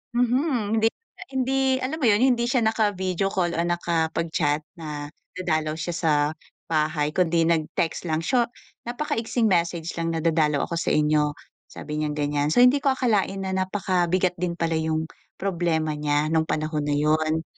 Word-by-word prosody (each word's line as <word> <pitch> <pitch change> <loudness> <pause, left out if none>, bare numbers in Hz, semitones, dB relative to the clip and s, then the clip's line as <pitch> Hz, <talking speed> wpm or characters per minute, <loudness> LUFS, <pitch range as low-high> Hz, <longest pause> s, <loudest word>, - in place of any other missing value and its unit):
mhm. 245 -3 +1
Hindi 225 - +4
niya 460 - -9
hindi 265 +1 +1 0.2
alam 275 +5 -2
mo 275 - 0
yun, 210 +1 +4
hindi 240 -2 +3
siya 245 -1 +2
naka-video 200 -4 0
call 180 -3 0
o 170 - -3
nakapag-chat 165 -3 0 0.2
na 150 -2 -6 0.2
dadalaw 155 -4 -1
siya 165 +2 -4
sa 165 -2 +1 0.6
bahay 155 -1 +1
kundi 170 -1 +2
nag-text 165 +1 -1
lang. 160 +1 -1
So, 240 +5 +2 0.4
napakaigsing 240 -3 -1
message 170 -3 0
lang 165 0 -1
na, - - -1
"Dadalaw 155 -3 +1
ako 170 - -3
sa - - 0
inyo," 150 -1 +2 0.4
sabi 150 0 -6
niyang 150 -1 -2
ganyan. 145 0 0
So, 245 - +3
hindi 255 +3 +5
ko 275 - +4
akalain 210 -6 +1
na 190 0 -2
napakabigat 185 -2 0
din 175 -1 -1
pala 165 -1 -1
yung 160 0 -1 0.3
problema 170 -5 0
niya 150 0 0
nung 160 -1 +3
panahon 155 -1 -1
na 145 - +1
yun. 155 +2 +1
170 Hz, 165 wpm, -24 LUFS, 155-205 Hz, 0.6 s, hindi